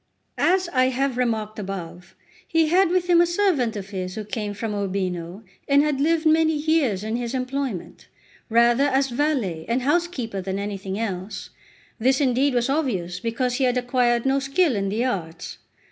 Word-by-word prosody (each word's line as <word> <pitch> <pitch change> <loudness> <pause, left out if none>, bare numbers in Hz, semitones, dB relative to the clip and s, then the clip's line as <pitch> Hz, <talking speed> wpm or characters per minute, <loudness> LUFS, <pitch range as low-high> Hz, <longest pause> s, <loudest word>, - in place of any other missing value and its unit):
As 370 0 +3
I 255 -1 +4
have 260 0 0
remarked 220 -4 -1
above, 180 -3 -7 0.3
he 325 -1 +2
had 365 +1 +4
with 360 0 +1
him 345 -1 +5
a 345 - +3
servant 345 - +1
of 200 0 -7
his 185 -2 -4
who 215 - -5
came 210 -2 -4
from 220 +1 -3
Urbino, 185 -1 -3 0.2
and 280 0 +5
had 295 -2 0
lived 325 +2 +2
many 320 0 +4
years 295 - +1
in 220 +2 -2
his 240 +1 -3
employment, 255 -6 -4 0.4
rather 235 +4 +4
as 270 -1 +1
valet 240 - -1
and 245 +2 0
housekeeper 280 - -1
than 190 +1 -3
anything 200 -1 -4
else; 195 -3 -4 0.5
this 260 +4 +3
indeed 270 0 +2
was 240 -1 +2
obvious, 205 - -1
because 245 +3 -1
he 270 - +2
had 250 0 +1
acquired 245 -1 +1
no 270 +1 +2
skill 275 +1 +1
in 195 -1 -1
the 225 +5 0
arts. 175 -8 -4
245 Hz, 175 wpm, -23 LUFS, 200-280 Hz, 0.5 s, him